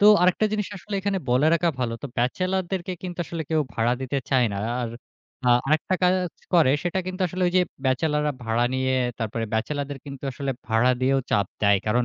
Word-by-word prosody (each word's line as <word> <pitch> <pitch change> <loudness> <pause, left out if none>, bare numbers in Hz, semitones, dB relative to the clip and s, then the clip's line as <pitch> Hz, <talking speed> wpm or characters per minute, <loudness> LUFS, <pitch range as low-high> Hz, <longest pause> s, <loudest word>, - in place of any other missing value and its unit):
তো 205 - +4 0.2
আরেকটা 180 +4 +3
জিনিস 210 -2 -1
আসলে 200 +3 -7
এখানে 195 0 0
বলে 130 +5 +4
রাখা 170 +1 +2
ভালো। 120 -2 -1
তো - - -3
ব্যাচেলর 185 +10 +1
দেরকে 185 -1 -2
কিন্তু 180 -1 -6
আসলে 165 0 -4
কেউ 160 -1 +3
ভাড়া 115 +2 +2
দিতে 130 +1 -2
চায় 130 -2 +4
না। - - -3 0.2
আর 120 - -2 0.6
আ - - +5 0.2
আরেকটা 155 +5 +2
কাজ 180 0 +5 0.4
করে 160 -7 +6
সেটা 175 +1 -1
কিন্তু 185 +1 -5
আসলে 185 +2 -3
ওই - - -4
যে, 185 - +6 0.2
ব্যাচেলররা 150 +3 +1
ভাড়া 115 +1 +1
নিয়ে 130 0 +1 0.3
তারপরে 115 0 -2
ব্যাচেলরদের 140 +5 -2
কিন্তু 140 -2 -8
আসলে 140 +1 -3 0.2
ভাড়া 115 +3 +3
দিয়েও 135 +1 +3
চাপ 100 -2 +2 0.2
দেয়। 100 -1 +5
কারণ 120 +3 +2
145 Hz, 200 wpm, -25 LUFS, 125-180 Hz, 0.6 s, করে